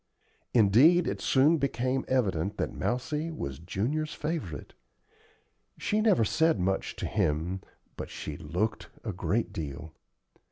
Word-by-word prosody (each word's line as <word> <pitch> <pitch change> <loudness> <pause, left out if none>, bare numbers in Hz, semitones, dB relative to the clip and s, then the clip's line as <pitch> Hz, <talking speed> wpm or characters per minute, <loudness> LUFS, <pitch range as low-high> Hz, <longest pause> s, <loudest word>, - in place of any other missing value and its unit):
Indeed, 125 - +6
it - - -2
soon 145 +5 +4
became 130 -1 0
evident 100 -6 0
that - - -2
Mousie 150 +6 -2
was 70 - -5
Junior's 125 - -2
favorite. 150 - -4 1.0
She 215 +1 0
never 205 - +4
said 160 -2 +2
much 95 +2 -1
to - - -4
him, 85 +6 0 0.4
but - - -5
she 75 - -6
looked 85 +8 -2
a 110 - -3
great 105 +6 -1
deal. 80 +1 -6
115 Hz, 125 wpm, -29 LUFS, -, 1.0 s, Indeed